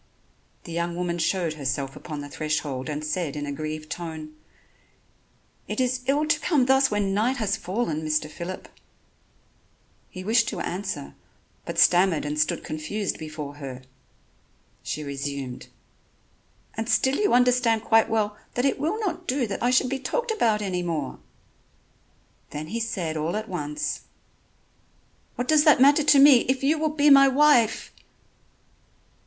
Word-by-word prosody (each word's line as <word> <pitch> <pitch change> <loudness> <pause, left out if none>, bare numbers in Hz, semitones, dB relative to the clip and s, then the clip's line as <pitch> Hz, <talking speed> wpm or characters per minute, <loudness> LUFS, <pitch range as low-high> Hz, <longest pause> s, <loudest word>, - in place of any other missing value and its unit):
The 170 - -10
young 170 +1 -2
woman 175 -1 -2
showed 170 -2 0
herself 135 -2 -3
upon 150 -3 -7
the 145 - -7
threshold 150 -3 -3
and 150 0 -4
said 155 -1 -2
in 145 0 -4
a 145 - -4
grieved 155 +1 -6
tone: 160 -3 -6 1.3
"It - - -4
is 255 0 0
ill 290 +3 +2
to 305 - +1
come 290 -7 +2
thus 265 +1 +4
when 205 -2 0
night 235 +6 +1
has 220 -5 0
fallen, 180 -5 -3
Mr. 155 0 0
Phillip." 170 +4 -7 1.4
He 185 - -8
wished 225 +4 +2
to - - -4
answer, 180 - -4 0.5
but - - -6
stammered 175 -3 +4
and 150 +1 -3
stood 155 - 0
confused 165 +7 -4
before 155 -2 -7
her. 130 -3 -8 1.0
She 150 - -4
resumed: 140 -2 -5 1.1
"And 225 +1 -4
still 265 +2 +2
you 410 -10 +2
understand 245 -3 +3
quite 225 0 +3
well 210 -2 0 0.2
that 245 - 0
it 275 - +1
will 325 +10 -1
not 370 -6 -3
do 260 0 0
that 200 -3 -5
I 240 - +2
should 255 0 +3
be 270 - -2
talked 475 - -2
about 220 - +1
any 185 -3 -2
more." 160 -6 -3 1.3
Then 155 +1 -6
he 230 - -3
said 180 -8 -3
all 160 +4 -2
at 215 +1 -3
once: 150 -6 -4 1.3
"What 245 - -3
does 310 -1 +5
that 300 -4 +6
matter 285 +3 +5
to 290 -1 +5
me, 275 -1 +8
if 265 0 0
you 305 +3 +2
will 310 0 +1
be 295 -1 +3
my 275 0 +8
wife!" 270 -5 +3
195 Hz, 155 wpm, -25 LUFS, 155-255 Hz, 1.4 s, me